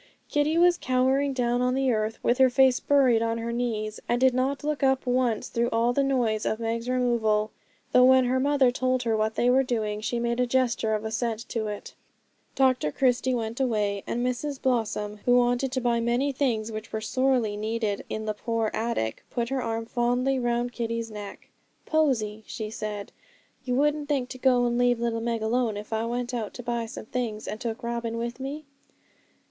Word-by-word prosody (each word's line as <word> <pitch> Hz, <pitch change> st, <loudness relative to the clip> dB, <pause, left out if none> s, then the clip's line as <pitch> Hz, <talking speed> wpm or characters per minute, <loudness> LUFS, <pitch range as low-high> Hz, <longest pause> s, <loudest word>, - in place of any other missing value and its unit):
Kitty 295 Hz, +2 st, +1 dB
was 350 Hz, 0 st, +4 dB
cowering 260 Hz, +2 st, +2 dB
down 245 Hz, -2 st, 0 dB
on 250 Hz, 0 st, +1 dB
the 270 Hz, 0 st, +1 dB
hearth, 220 Hz, -1 st, 0 dB
with 245 Hz, +2 st, +2 dB
her 260 Hz, -1 st, +6 dB
face 260 Hz, 0 st, +4 dB
buried 260 Hz, -5 st, +3 dB
on 230 Hz, 0 st, 0 dB
her 230 Hz, 0 st, -3 dB
knees, 220 Hz, -3 st, -2 dB
and 240 Hz, -, +2 dB
did 260 Hz, 0 st, +4 dB
not 265 Hz, +3 st, -1 dB
look 300 Hz, 0 st, -2 dB
up 265 Hz, -1 st, +2 dB
once 245 Hz, -3 st, +1 dB
through 235 Hz, +1 st, 0 dB
all 230 Hz, +1 st, +1 dB
the 280 Hz, -, +2 dB
noise 240 Hz, -6 st, +1 dB
of 220 Hz, -, -1 dB
Meg's 230 Hz, +1 st, -2 dB
removal; 225 Hz, -4 st, +1 dB, 0.4 s
though 250 Hz, 0 st, +6 dB
when 260 Hz, 0 st, +6 dB
her 255 Hz, +1 st, +1 dB
mother 275 Hz, -2 st, +3 dB
told 255 Hz, 0 st, 0 dB
her 225 Hz, -2 st, +1 dB
what 220 Hz, 0 st, 0 dB
they 240 Hz, -, +1 dB
were 255 Hz, +2 st, +5 dB
doing 215 Hz, -5 st, -2 dB
she 230 Hz, +2 st, -2 dB
made 235 Hz, +1 st, -1 dB
a 250 Hz, -, +2 dB
gesture 240 Hz, -3 st, +1 dB
of 215 Hz, +1 st, -4 dB
assent 225 Hz, +1 st, -2 dB
to 220 Hz, -2 st, -2 dB
it. 210 Hz, -1 st, -6 dB, 0.6 s
Dr 255 Hz, -, +2 dB
Christie 255 Hz, -, +1 dB
went 230 Hz, 0 st, -3 dB
away; 210 Hz, -6 st, 0 dB
and 240 Hz, +1 st, -1 dB
Mrs 265 Hz, +3 st, -2 dB
Blossom, 215 Hz, -4 st, -1 dB
who 245 Hz, 0 st, +5 dB
wanted 245 Hz, +2 st, +2 dB
to 260 Hz, -, +1 dB
buy 240 Hz, -1 st, +1 dB
many 240 Hz, +4 st, +1 dB
things 235 Hz, -5 st, -1 dB
which 215 Hz, 0 st, -7 dB
were 220 Hz, -, -2 dB
sorely 245 Hz, -1 st, +1 dB
needed 215 Hz, -1 st, -2 dB
in 220 Hz, 0 st, -4 dB
the 215 Hz, -, -1 dB
poor 225 Hz, 0 st, -2 dB
attic, 220 Hz, -, -2 dB
put 235 Hz, -1 st, -2 dB
her 270 Hz, -1 st, -1 dB
arm 225 Hz, -1 st, -2 dB
fondly 245 Hz, +3 st, 0 dB
round 240 Hz, 0 st, 0 dB
Kitty's 230 Hz, -1 st, -3 dB
neck. 205 Hz, -1 st, -9 dB, 0.4 s
'Posy,' 230 Hz, -9 st, 0 dB
she 215 Hz, -2 st, -5 dB
said, 210 Hz, -2 st, -5 dB, 0.5 s
'you 250 Hz, -1 st, -1 dB
wouldn't 295 Hz, +2 st, +1 dB
think 265 Hz, -4 st, 0 dB
to 255 Hz, -, -8 dB
go 250 Hz, -2 st, +3 dB
and 240 Hz, 0 st, 0 dB
leave 245 Hz, -1 st, +3 dB
little 230 Hz, -1 st, -1 dB
Meg 230 Hz, -1 st, -2 dB
alone 225 Hz, -1 st, 0 dB
if 210 Hz, +2 st, -7 dB
I 220 Hz, +1 st, 0 dB
went 245 Hz, +1 st, -3 dB
out 225 Hz, -4 st, -4 dB
to 245 Hz, -, -7 dB
buy 235 Hz, -1 st, -2 dB
some 220 Hz, -, -8 dB
things, 225 Hz, -3 st, -4 dB
and 215 Hz, -, -5 dB
took 230 Hz, -1 st, -4 dB
Robin 235 Hz, -1 st, -3 dB
with 235 Hz, +2 st, -4 dB
me?' 285 Hz, +3 st, -5 dB
240 Hz, 200 wpm, -26 LUFS, 225-255 Hz, 0.6 s, her